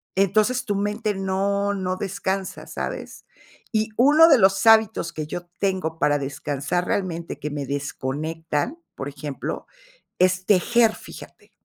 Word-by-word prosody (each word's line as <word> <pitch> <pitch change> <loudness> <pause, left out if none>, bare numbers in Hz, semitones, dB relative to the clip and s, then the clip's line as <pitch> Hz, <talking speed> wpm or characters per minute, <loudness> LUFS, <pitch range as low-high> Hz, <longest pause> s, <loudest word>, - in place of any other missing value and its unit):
entonces 215 +6 +2
tu 205 -4 -1
mente 210 +1 -1
no 200 +1 0
no 185 -1 -2
descansa, 195 0 -3
¿sabes? - - -6 0.5
Y 215 0 0
uno 295 +7 +7
de 290 -5 +7
los 195 0 +3
hábitos 220 -6 +4
que 155 -2 -5
yo 175 +3 -5
tengo 185 -5 -1
para 145 -1 +3
descansar 140 +4 -2
realmente, 170 -4 -2
que 150 - -4
me 145 -1 -4
desconectan, 150 - -3 0.2
por 135 - -5
ejemplo, 145 0 -6 0.5
es 185 0 +2
tejer, 220 +3 +4
fíjate. - - -13
190 Hz, 135 wpm, -23 LUFS, 155-210 Hz, 0.5 s, uno